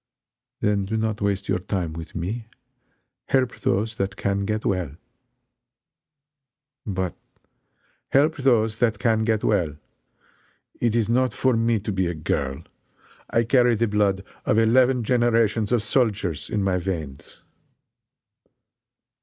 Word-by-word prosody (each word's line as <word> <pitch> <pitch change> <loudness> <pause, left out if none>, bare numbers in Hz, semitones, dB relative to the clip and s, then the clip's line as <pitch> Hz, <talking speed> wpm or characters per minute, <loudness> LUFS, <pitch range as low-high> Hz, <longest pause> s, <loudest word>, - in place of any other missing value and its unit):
"Then 100 -1 +1
do 110 +3 -2
not 110 -1 -1
waste 100 -1 -1
your - - +1
time 90 -3 -3
with 80 0 -9
me 105 +7 -4 0.8
help 130 -2 +1
those 110 +3 0
that 95 0 -2
can 100 0 -1
get 110 +1 -2
well." 90 -7 -1 1.9
"But 95 -3 -2 0.5
" - - -44 0.2
"Help 150 +4 +3
those 115 -5 +2
that 115 -4 +2
can 110 0 +1
get 110 -1 0
well! 85 -8 +1 1.0
It 115 -2 +1
is, 115 -3 +2
not 125 +2 +1
for 130 -2 +2
me 115 0 +2
to 105 - -3
be 95 -2 0
a 85 - -3
girl. 70 -3 -2 0.7
I 115 - +2
carry 120 0 +4
the 115 +2 +1
blood 100 -2 +1 0.2
of 110 - +1
eleven 125 +2 +4
generations 115 -3 +2
of 120 -3 +2
soldiers 105 - 0
in 105 -2 -1
my 95 -2 +1
veins!" 80 -7 -6
105 Hz, 135 wpm, -24 LUFS, 95-115 Hz, 1.9 s, carry